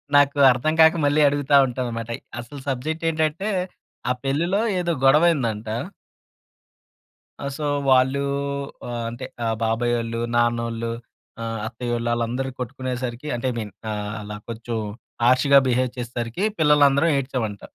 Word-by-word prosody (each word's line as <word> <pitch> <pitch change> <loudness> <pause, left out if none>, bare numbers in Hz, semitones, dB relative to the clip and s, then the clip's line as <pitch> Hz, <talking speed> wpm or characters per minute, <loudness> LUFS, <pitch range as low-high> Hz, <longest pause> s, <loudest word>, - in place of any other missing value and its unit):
నాకు 145 0 +5
అర్థం 130 +6 0
కాక 160 +1 +7
మళ్ళీ 145 +1 +3
అడుగుతా 145 0 +2
ఉంటాననమాట. 120 -2 -4 0.3
అసలు 120 +4 -8
సబ్జెక్టేంటంటే, 160 +6 -1 0.6
ఆ - - +3
పెళ్ళిలో 170 +9 +1 0.2
ఏదో 175 -1 0
గొడవైయిందంటా 135 -8 +3 1.7
ఆ! - - -2
సో, 150 - -4 0.3
వాళ్ళూ 130 +2 +4 0.7
ఆహ్, 120 -1 -3
అంటే, 120 +2 -7 0.2
ఆహ్, 115 -1 0
బాబాయోళ్ళు, 115 0 0 0.2
నాన్నోళ్ళు 115 -1 0 0.5
ఆహ్, 115 -1 -3
అత్తయ్యోళ్ళు, 120 0 -3
ఆళ్ళందరూ 120 +3 -1
కొట్టుకునేసరికి 125 +1 -4
అంటే, 120 - -3
ఐ - - -7
మీన్ 105 -3 -5 0.2
ఆహ్, 105 0 -4
అలా 105 0 -7
కొంచెం 115 0 -4 0.5
హర్ష్‌గా 130 +3 +6
బిహేవ్ 125 0 +1
చేసేసరికి, 120 - -3 0.2
పిల్లలందరం 150 +1 +5
ఏడ్చామంట. 125 -7 -3
125 Hz, 120 wpm, -23 LUFS, 115-145 Hz, 1.7 s, కాక